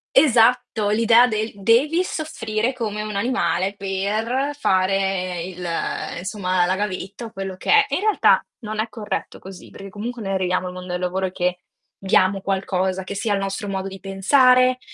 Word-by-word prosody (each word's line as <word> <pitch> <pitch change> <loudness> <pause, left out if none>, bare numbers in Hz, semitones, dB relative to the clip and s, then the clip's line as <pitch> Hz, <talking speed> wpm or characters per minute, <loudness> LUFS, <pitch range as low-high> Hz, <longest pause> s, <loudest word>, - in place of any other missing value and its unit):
Esatto, 240 -5 +4
l'idea 230 +3 +5
del 220 -1 -2
"devi 250 - +3
soffrire 240 -9 -2
come 215 -4 -3
un 215 -1 -5
animale 195 -4 0
per 215 +8 -2
fare 185 -4 0
il 180 0 -7 0.5
insomma, 185 -1 0
la 185 +1 +1
gavetta 200 +2 -4
o 225 - -9
quello 195 -2 -5
che - - -2
è". 430 -1 +6
In - - +1
realtà 430 +1 +3 0.2
non 215 -2 -6
è 220 - -1
corretto 215 -3 -5
così, 190 -1 -12
perché 195 - -10
comunque 225 +4 -6
noi 195 -1 -2
arriviamo 185 -1 0
nel 180 - -5
mondo 180 0 -8
del 180 - -2
lavoro 185 +1 -1
che 180 -1 -2 0.4
diamo 195 0 +2
qualcosa, 190 -1 -1
che 185 - -6
sia 205 +1 -1
il 200 - 0
nostro 195 +1 -3
modo 195 -1 -3
di 195 0 -8
pensare, 255 +7 +4
200 Hz, 170 wpm, -22 LUFS, 190-230 Hz, 0.5 s, è